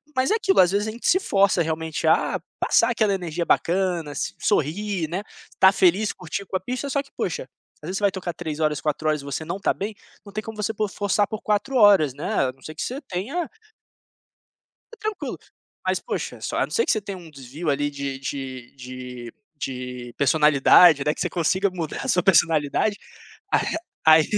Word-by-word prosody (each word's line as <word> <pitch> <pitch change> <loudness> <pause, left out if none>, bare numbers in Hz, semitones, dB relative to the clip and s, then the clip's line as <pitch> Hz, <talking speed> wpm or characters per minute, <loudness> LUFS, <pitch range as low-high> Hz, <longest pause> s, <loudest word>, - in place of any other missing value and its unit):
Mas 260 +5 +2
é - - +4
aquilo, 435 -4 +2
às 180 0 +4
vezes 205 +2 0
a 220 - -2
gente 235 - -5
se 370 - +5
força 195 - +3
realmente, 160 -1 -2
a - - +2 0.2
passar 230 - +3
aquela 215 -4 +2
energia 175 -3 -3
bacana, 175 -4 +1
s 145 - -3
sorrir, 190 +1 0
né, 180 +4 -2 0.3
estar 190 0 +5
feliz, 195 +3 +3
curtir 185 +2 -6
com 190 - -6
a - - -8
pista, 250 +8 -4
só 280 +1 0
que - - -23
poxa, - - -3 0.3
às 150 - -9
vezes 190 - -2
você 205 - -5
vai 200 - +3
tocar 185 -2 -4
3 160 -3 -5
horas, 150 -3 0
4 155 +1 -1
horas, 155 -1 0
e - - -12
você 140 +3 -4
não 170 +4 -4
tá 200 - +1
bem, 205 +3 -4 0.3
não 200 - -12
tem 215 +1 -3
como 225 +1 -7
você 210 +1 -1
p 215 0 -1
forçar 205 +1 0
por 215 - -5
4 215 +6 0
horas, 195 - +6
né, 150 - -3 0.2
a - - -4
não 135 - -27
ser 155 - -7
que - - -5
você 260 +3 -4
tenha 265 - -3 1.4
É - - -11
tranquilo, 430 -2 -4 0.5
mas - - +1
poxa, - - -4
só - - -3
a - - +3
não - - -17
ser 460 - +2
que - - +2
você 215 - +1
tenha 200 -1 -6
um 170 -3 -12
desvio 140 +4 -6
ali 145 +1 +1
de 140 -1 -5
de 130 -2 -6
de 125 -2 -8 0.2
de 125 -3 -6
personalidade, 150 +2 +6
né, 150 - +2
que - - -7
você - - 0
consiga 185 +3 +1
mudar 170 -4 -5
a - - -4
sua 180 - +3
personalidade, 165 +2 +3 0.6
ah, - - +5 0.5
aí 160 0 +8
180 Hz, 210 wpm, -24 LUFS, 150-205 Hz, 1.4 s, aí